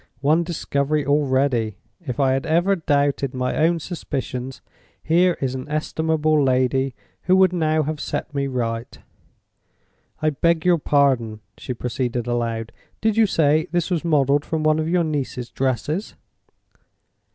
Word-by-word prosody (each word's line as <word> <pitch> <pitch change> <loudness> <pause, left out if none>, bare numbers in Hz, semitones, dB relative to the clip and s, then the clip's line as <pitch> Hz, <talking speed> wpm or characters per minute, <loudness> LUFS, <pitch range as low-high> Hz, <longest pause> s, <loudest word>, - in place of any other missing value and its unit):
"One 155 +4 +3
discovery 150 -3 -1
already. 130 -7 +1 0.2
If 140 -8 -6
I 135 -2 +3
had 135 +4 -1
ever 175 +5 +3
doubted 140 -5 0
my 125 0 -1
own 165 +2 +2
suspicions, 135 -6 -5 0.4
here 175 +3 +3
is 130 -2 -1
an 130 +2 -6
estimable 155 0 +1
lady 130 0 +1 0.3
who 185 - +4
would 190 -1 +4
now 155 -2 +1
have 155 +1 -3
set 150 - -4
me 140 -1 -1
right.—I 120 +5 -7
beg 170 +3 +1
your 175 -2 +4
pardon," 130 -8 +1
she 125 - -6
proceeded, 120 0 -2
aloud, 115 -2 -2 0.3
"did 220 -1 +1
you 225 -1 +4
say 155 -3 +2
this 175 +1 -1
was 170 -3 0
modeled 145 -3 +2
from 160 -1 -2
one 155 0 +3
of 160 +1 -1
your 175 0 +2
niece's 135 -6 -3
dresses?" 135 - -2
145 Hz, 140 wpm, -22 LUFS, 130-160 Hz, 0.4 s, who